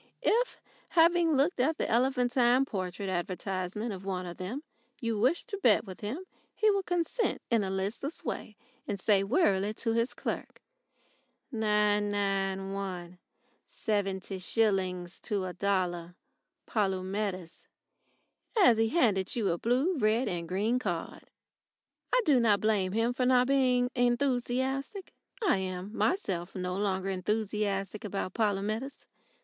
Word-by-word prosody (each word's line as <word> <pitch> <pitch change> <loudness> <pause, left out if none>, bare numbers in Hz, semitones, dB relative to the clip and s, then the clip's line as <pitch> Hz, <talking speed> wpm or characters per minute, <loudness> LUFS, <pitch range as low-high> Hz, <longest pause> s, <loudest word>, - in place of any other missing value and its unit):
If, 485 +2 +2 0.3
having 335 0 +4
looked 280 +3 +2
at 305 +6 +2
the - - -1
elephantine 250 +1 +3
portrait 190 -3 -4
advertisement 185 +3 -3
of 190 0 -8
one 185 -2 -3
of 175 -1 -7
them, 225 +11 -5 0.4
you 230 -5 -1
wished 260 - +2
to 400 -3 -4
bet - - +4
with 185 -2 -10
him, 255 - -4 0.3
he 430 -1 +4
would 395 -2 -1
consent 355 +6 0
in 230 -3 +3
a 190 - -2
listless 200 +11 -3
way, 210 - -5 0.3
and 205 -2 -3
say 200 -1 +3
wearily 205 - +2
to 230 0 -1
his 230 +2 0
clerk: - - -5 0.9
"Nine 210 -2 +2
nine 195 -1 -1
one, 180 -3 -5 0.5
seventy 195 -2 -2
shillings 185 -3 0
to 200 -4 -2
a 180 - -5
dollar 180 -3 -1 0.5
Polumetis," 190 -3 -2 0.9
as 240 - +6
he 225 0 +3
handed 210 - +2
you 220 -5 +1
a 170 - -1
blue, 260 +10 +1
red, 220 +3 +2
and 170 -2 -3
green 215 +7 +1
card. 175 -8 -4 0.9
I - - +4
do 280 -5 +5
not 215 -4 +4
blame 195 -3 +1
him 230 +2 +1
for 250 0 0
not 250 -1 +5
being 250 -2 +2
enthusiastic. 260 - 0 0.3
I 345 - +4
am 190 +2 -4
myself 190 - -1
no 180 -1 -2
longer 195 -1 -1
enthusiastic 205 +1 -1
about 195 -3 -3
Polumetis. 215 +5 -1
210 Hz, 135 wpm, -30 LUFS, 190-250 Hz, 0.9 s, as